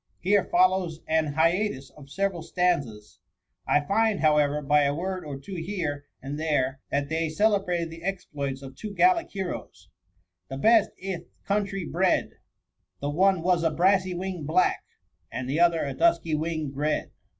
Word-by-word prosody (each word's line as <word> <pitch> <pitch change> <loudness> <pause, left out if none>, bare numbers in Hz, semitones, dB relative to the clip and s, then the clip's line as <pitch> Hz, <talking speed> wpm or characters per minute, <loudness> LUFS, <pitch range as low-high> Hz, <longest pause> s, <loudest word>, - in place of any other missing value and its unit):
Here 200 +1 +3
follows 180 -3 +2
an 155 -2 +1
hiatus 165 -3 +1
of 140 -2 -15
several 195 +3 -1
stan 180 0 +1
zas: 105 -5 -13 0.5
I 145 - +3
find, 215 +6 +1
however, 150 -1 +2
by 150 +1 +4
a 140 0 +1
word 185 +2 -3
or 145 -2 -6
two 190 +9 -10
here 165 -5 -3 0.2
and 140 +2 -5
there, 140 -4 0
that 140 0 -1
they 160 +1 -1
celebrated 180 -2 +1
the 165 0 -10
exploits 145 -7 -4
of 135 0 -10
two 205 +7 -7
gallic 360 -2 +3
heroes: 190 -3 -6 0.2
— 90 -1 -42
* 90 0 -56
The 135 - -5
best 220 +8 +4
i' 190 -2 -2
th' - - -20
country 195 -2 -1
bred; 180 +3 +1 0.7
The 145 +1 -2
one 185 +2 +3
was 180 -1 +2
a 165 - +3
brassy 185 +3 +2
wing 180 -2 -4
blacky 180 +3 +3 0.5
And 125 +2 -4
the 140 +5 -1
other 170 -2 +3
a 140 - -3
dusky 330 - +2
wing'd 155 -2 -2
red.' 150 +2 -1
165 Hz, 175 wpm, -26 LUFS, 145-190 Hz, 0.7 s, by